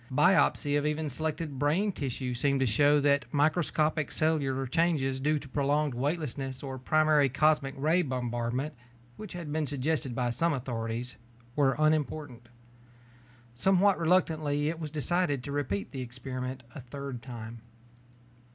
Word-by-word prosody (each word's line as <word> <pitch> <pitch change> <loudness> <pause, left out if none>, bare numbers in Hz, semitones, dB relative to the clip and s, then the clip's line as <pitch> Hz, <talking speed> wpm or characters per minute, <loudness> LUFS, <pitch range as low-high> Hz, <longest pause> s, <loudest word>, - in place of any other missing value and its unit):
Biopsy 145 -1 +3
of 145 - -3
even 150 0 -1
selected 155 0 -3
brain 165 +9 +2
tissues 125 -5 -4
seemed 140 0 +2
to - - +3
show 145 +6 +4
that 140 0 +2
microscopic 155 0 +1
cellular 140 -4 0
changes 135 -2 +1
due 150 +3 +1
to 145 - -8
prolonged 145 +1 +1
weightlessness 135 -1 -3
or 135 -1 -5
primary 155 +1 +3
cosmic 140 0 +2
ray 160 +6 +3
bombardment, 125 0 -2 0.4
which 215 -3 -8
had 170 -4 -6
been 155 -1 0
suggested 140 -2 -1
by 120 -1 0
some 165 +7 +1
authorities, 120 -2 -4 0.4
were 135 -3 +3
unimportant. 150 -5 0 1.0
Somewhat 190 +9 +3
reluctantly, 155 -4 +2
it 165 0 -4
was 155 -2 -4
decided 150 -2 0
to 140 - -6
repeat 100 -10 -2
the 135 - -5
experiment 130 +1 -5
a 150 - -8
third 135 0 -7
time. 115 -2 -8
145 Hz, 140 wpm, -29 LUFS, 130-155 Hz, 1.0 s, show